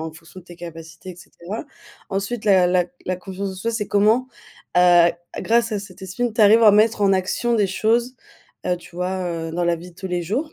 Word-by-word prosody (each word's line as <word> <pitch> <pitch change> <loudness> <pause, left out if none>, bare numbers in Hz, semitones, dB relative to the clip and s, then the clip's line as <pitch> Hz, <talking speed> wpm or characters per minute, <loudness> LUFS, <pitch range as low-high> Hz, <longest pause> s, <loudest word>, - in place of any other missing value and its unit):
en 160 0 -5
fonction 170 +3 -14
de - - -21
tes 175 -1 -13
capacités 165 +1 -10
et - - -17
cetera. 185 - -8 0.5
Ensuite 200 +4 -3
la 190 -4 +5
la 180 0 +3
c 175 - -20 0.2
la 185 - -1
confiance 190 +2 -6
en - - -8
soi 225 +5 -3
c'est 220 -3 -3
comment, 220 +5 +2 0.5
heu, 175 -1 +6 0.3
grâce 230 0 +1
à 210 - -1
cet 200 -1 -11
estime, 220 +5 -3
tu 225 - 0
arrives 220 +3 +6
à 215 - +8
mettre 215 +2 +3
en 195 -1 +4
action 190 +6 0
des 210 -3 +2
choses, 230 +6 0 0.5
heu, 180 - +1
tu 175 - -16
vois, 185 +1 -2
heu, 165 -1 -4
dans 175 +1 -1
la 170 0 +1
vie 175 +2 -11
de - - -31
tous 190 - -6
les 180 -1 -2
jours. 260 - -3
190 Hz, 235 wpm, -21 LUFS, 175-220 Hz, 0.5 s, à